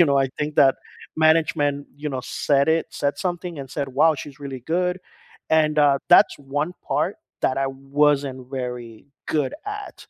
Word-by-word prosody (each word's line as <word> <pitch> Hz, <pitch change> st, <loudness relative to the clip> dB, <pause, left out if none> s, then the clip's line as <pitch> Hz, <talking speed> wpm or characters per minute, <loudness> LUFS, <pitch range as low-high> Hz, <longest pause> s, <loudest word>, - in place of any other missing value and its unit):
you -, -, +8 dB
know, 140 Hz, -1 st, +3 dB
I 135 Hz, -1 st, +2 dB
think 150 Hz, 0 st, -3 dB
that 135 Hz, -1 st, +6 dB, 0.4 s
management, 155 Hz, -3 st, +2 dB
you 150 Hz, +1 st, -4 dB
know, 130 Hz, -3 st, -3 dB
said 140 Hz, -1 st, +1 dB
it 160 Hz, 0 st, +2 dB
said 145 Hz, 0 st, -1 dB
something 175 Hz, -3 st, -3 dB
and 135 Hz, -2 st, -9 dB
said, 140 Hz, -2 st, -3 dB
"Wow, 160 Hz, 0 st, +5 dB
she's 140 Hz, +1 st, -9 dB
really 135 Hz, -3 st, -7 dB
good," 180 Hz, 0 st, 0 dB, 0.5 s
and, 155 Hz, -1 st, +3 dB
uh, 140 Hz, -2 st, +5 dB
that's -, -, +7 dB
one 145 Hz, +4 st, -3 dB, 0.2 s
part -, -, 0 dB, 0.3 s
that 130 Hz, -, +2 dB
I 135 Hz, -, +1 dB, 0.3 s
wasn't 140 Hz, -3 st, +3 dB
very 125 Hz, -2 st, -6 dB, 0.3 s
good 145 Hz, -4 st, 0 dB
at, 415 Hz, -1 st, -6 dB
145 Hz, 170 wpm, -23 LUFS, 135-160 Hz, 0.5 s, you